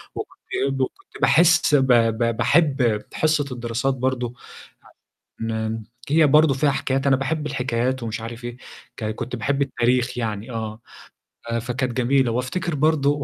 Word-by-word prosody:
وكنت - - -7 0.2
إيه، 135 - +1
وكنت 135 -1 -5
باحس 170 -2 +5
ب 135 -2 +3
ب 115 0 +2
باحب 125 -4 +2
حصّة 155 -2 +1
الدراسات 120 +2 -1
برضه 125 -2 -2 0.5
ع - - -19 0.5
ن 110 0 -2 0.3
هي 155 +1 +5
برضه 150 +1 +5
فيها 140 +2 +2
حكايات، 135 0 -1
أنا 135 - +5
باحب 150 +3 -2
الحكايات 130 -2 -1
ومش 115 0 -4
عارف 115 +1 -7
إيه، 120 0 -6 0.4
ك 110 - -4
كنت 125 +1 -5
باحب 135 +4 -1
التاريخ 125 -1 +1
يعني 110 0 -3
آه. 110 -1 -5 0.7
ف - - -3
فكانت 125 +2 -2
جميلة. 130 0 +2
وأفتكر 130 +8 -2
برضه 145 -1 +2
130 Hz, 150 wpm, -22 LUFS, 115-140 Hz, 0.7 s, باحس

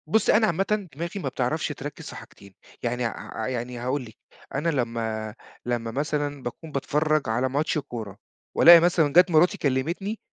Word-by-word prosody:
بُصّي، 220 +6 +3
أنا 220 0 +3
عامةً 195 +3 0
دماغي 170 +6 -4
ما 135 - -2
بتعرفش 130 +5 -1
تركّز 145 -1 -7
في - - -9
حاجتين. 100 -1 -13 0.3
يعني 125 0 -1
ع 110 0 -5
يعني 125 -1 -4
هاقول 130 +2 -2
لِك. 110 -1 -14 0.4
أنا 150 +5 0
لمّا 115 -5 -2 0.3
لمّا 120 -2 -2
مثلًا 145 +1 -2
باكون 155 +6 -7
باتفرّج 150 0 0
على 120 +4 +1
ماتش 150 +4 0
كورة 115 -8 -6 0.4
وألاقي 170 0 +10
مثلًا 165 -4 +2
جات 180 +1 +6
مراتي 160 +3 +4
كلّمتني 165 +11 -1
140 Hz, 165 wpm, -25 LUFS, 120-165 Hz, 0.4 s, وألاقي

